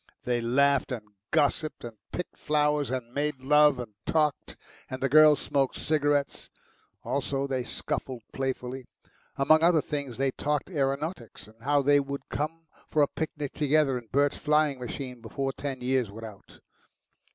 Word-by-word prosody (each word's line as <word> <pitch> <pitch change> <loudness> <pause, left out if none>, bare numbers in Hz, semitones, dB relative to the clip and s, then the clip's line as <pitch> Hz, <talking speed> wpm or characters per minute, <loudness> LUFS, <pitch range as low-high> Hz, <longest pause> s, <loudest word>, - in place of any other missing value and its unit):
They 120 -1 0
laughed 140 +4 +2
and 110 -4 -5 0.2
gossiped 150 +2 +1
and 115 -2 -7 0.2
picked 180 - -5
flowers 150 -1 +1
and 125 -2 -4
made 145 -1 -2
love 150 +2 +5
and 120 -4 -7
talked, 150 -3 0 0.3
and 130 - -5
the 135 - +1
girls 155 +1 +7
smoked 135 -2 0
cigarettes. 145 -2 0 0.5
Also 135 +2 -1
they 130 -2 -2
scuffled 125 0 -4
playfully. 130 -1 -3 0.5
Among 155 +3 +4
other 170 -1 +5
things 140 -5 -4
they 135 0 +1
talked 150 +6 -2
aeronautics, 140 -3 -2
and 110 +1 -20
how 145 +2 +2
thev 145 0 +3
would 140 -1 -6
come 165 +3 -3 0.2
for 150 - +3
a - - +3
picnic 150 -2 -4
together 150 -2 +2
in 120 -2 -6
Bert's 140 +2 +2
flying 150 -2 +2
machine 125 0 -6
before 135 +4 -3
ten 135 -2 -5
years 125 -3 +1
were 110 +3 -8
out. 105 -3 -13
140 Hz, 155 wpm, -28 LUFS, 125-150 Hz, 0.5 s, girls